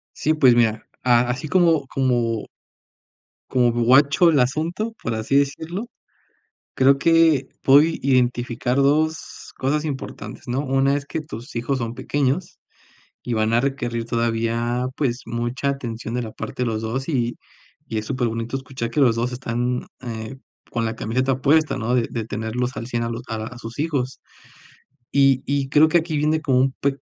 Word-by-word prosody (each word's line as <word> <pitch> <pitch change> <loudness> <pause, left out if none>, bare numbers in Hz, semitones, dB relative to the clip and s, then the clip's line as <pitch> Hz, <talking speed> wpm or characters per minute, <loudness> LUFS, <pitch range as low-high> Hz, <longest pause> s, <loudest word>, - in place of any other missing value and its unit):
Sí, 155 - +1
pues 130 -6 +5
mira, 110 -2 +1 0.2
a 120 -2 +5
así 130 +5 -3
como 165 -5 +3
como 120 -5 0 1.1
como 125 -2 +3
guacho 135 +8 +5
el 155 -4 +3
asunto, 165 - -1
por 115 - -2
así 110 +5 -1
decirlo, 160 - -1 0.9
creo 135 +1 +5
que 165 -4 +4
puedo 140 +2 +7
i 165 +1 0
identificar 125 -2 +1
2 155 +3 0
cosas 150 +4 0
importantes, 130 -5 -6
¿no?, 125 +2 0
una 135 +1 +2
es 140 - -6
que 160 - -4
tus 125 -4 -10
hijos 120 +4 -1
son 115 -2 -3
pequeños 145 +7 -1 0.6
y 120 - -3
van 110 +1 +1
a 120 - +4
requerir 120 -4 -2
todavía, 115 +1 0
pues, 130 -4 -1
mucha 120 +4 -2
atención 120 -4 -4
de 125 - -1
la 110 - -6
parte 115 +3 -4
de - - -1
los 110 -1 -2
2 120 +4 -3
y 120 -5 0 0.5
y 110 - -1
es 110 - -7
superbonito 120 -1 -2
escuchar 130 -3 -5
que 135 - -1
los 125 -5 +4
2 120 +2 -1
están, 125 0 -2
eh, 115 0 -6 0.4
con 120 - -1
la 110 0 -2
camiseta 130 +4 -1
puesta, 150 +2 +3
¿no?, 120 0 -1
de 120 -2 +2
de 115 -2 -4
tenerlos 115 +4 -3
al 115 - -5
100 120 -1 -2
a 115 - -2
los 115 0 -4
a 110 +2 -5
sus 115 0 -8
hijos, 135 -5 -1 0.9
y 135 -2 +4
y 140 -1 -1
creo 150 +2 +6
que 170 +2 +4
aquí 160 -1 -3
viene 155 +2 +1
como 135 -5 +2
un 130 0 +2
peq 140 0 0
130 Hz, 175 wpm, -22 LUFS, 115-140 Hz, 1.1 s, puedo